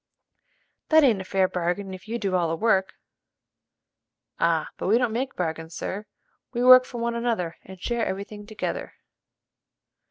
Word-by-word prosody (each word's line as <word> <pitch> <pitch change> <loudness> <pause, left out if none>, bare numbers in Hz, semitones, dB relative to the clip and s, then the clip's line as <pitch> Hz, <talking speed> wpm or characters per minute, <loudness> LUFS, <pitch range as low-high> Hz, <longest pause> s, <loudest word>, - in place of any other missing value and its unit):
"That 315 -1 +6
ain't 225 -8 +4
a - - -5
fair 190 0 +1
bargain 180 +2 -2
if 185 +1 -10
you 230 +2 -2
do 195 -5 -2
all 175 -3 +2
the 165 - 0
work." 190 -1 +1 1.4
"Ah, 165 -2 +1
but - - -3
we 215 +4 +5
don't 245 -3 0
make 260 +3 -2
bargains, 160 -1 -4
sir: 210 +2 -5 0.5
we 240 0 0
work 255 0 +9
for 245 - -8
one 235 0 -1
another 230 -8 -2
and 190 -1 -12
share 235 +4 -1
every 195 -1 -2
thing 205 0 -11
together." 215 0 -4
200 Hz, 165 wpm, -25 LUFS, 180-235 Hz, 1.4 s, work